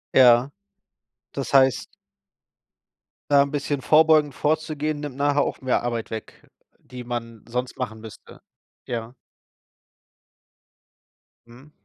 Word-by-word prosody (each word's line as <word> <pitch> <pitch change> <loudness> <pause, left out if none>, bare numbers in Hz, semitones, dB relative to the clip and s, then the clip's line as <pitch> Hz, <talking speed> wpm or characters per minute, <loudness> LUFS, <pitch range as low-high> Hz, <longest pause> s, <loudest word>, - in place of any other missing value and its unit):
Ja. 125 0 +6 0.8
Das 135 -4 -5
heißt 130 -3 +4 1.4
da 140 -1 +6
'n 140 - 0
bisschen 145 -1 -2
vorbeugend 155 0 +4
vorzugehen, 155 0 -1
nimmt 145 -3 -6
nachher 145 +1 +1
auch - - -2
mehr 130 -1 0
Arbeit 120 -2 -4
weg, 110 -1 -8 0.3
die 125 -1 -11
man 115 -2 -6
sonst 125 +1 -4
machen 110 -3 -5
müsste. 110 -1 -13 0.5
Ja. 115 0 -5 2.3
Mhm. 125 +6 -17
130 Hz, 105 wpm, -23 LUFS, 120-145 Hz, 2.3 s, Ja